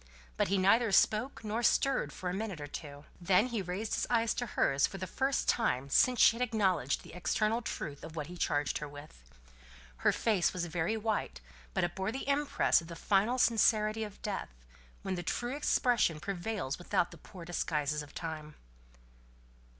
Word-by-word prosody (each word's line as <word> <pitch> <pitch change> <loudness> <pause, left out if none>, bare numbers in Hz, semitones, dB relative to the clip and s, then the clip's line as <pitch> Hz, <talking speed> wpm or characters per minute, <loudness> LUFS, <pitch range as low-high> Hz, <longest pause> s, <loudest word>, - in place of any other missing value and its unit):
But - - +1
he 195 +3 +1
neither 210 +4 +4
spoke 215 +7 +2
nor 220 +2 -2
stirred 260 - +2
for 185 - -6
a 180 - -1
minute 195 -4 -4
or 145 - -5
two. 145 0 -8 0.2
Then 190 +7 +3
he 230 -4 -2
raised 190 +4 -4
his - - 0
eyes 230 -2 +2
to 245 - -3
hers 135 -9 +2
for 195 - -8
the 185 - -4
first 270 +8 -1
time 140 - +1
since 250 - +4
she 230 - +7
had - - -5
acknowledged 200 - +1
the - - -13
external 215 +6 0
truth 145 -10 -5
of 160 - -9
what 150 -2 -3
he 175 +4 -9
charged 145 -6 0
her 150 - -5
with. 145 - -12 0.8
Her - - +3
face 210 -6 +1
was 180 -2 -2
very 170 +5 -1
white, 215 - -2 0.4
but - - +1
it 175 0 -1
bore 190 +2 -2
the 265 +3 -5
impress 285 -8 +2
of 165 - -11
the 170 - -8
final 205 +8 +2
sincerity 220 -2 +3
of 210 -2 -8
death, 205 -2 -3 0.5
when 190 - -2
the 175 - -3
true 240 +9 -2
expression 240 - +2
prevails 185 -4 -3
without 175 0 0
the 170 - -12
poor 175 +1 -11
disguises 150 -3 -1
of 150 - -12
time. 155 -2 -6
190 Hz, 190 wpm, -32 LUFS, 160-225 Hz, 0.8 s, she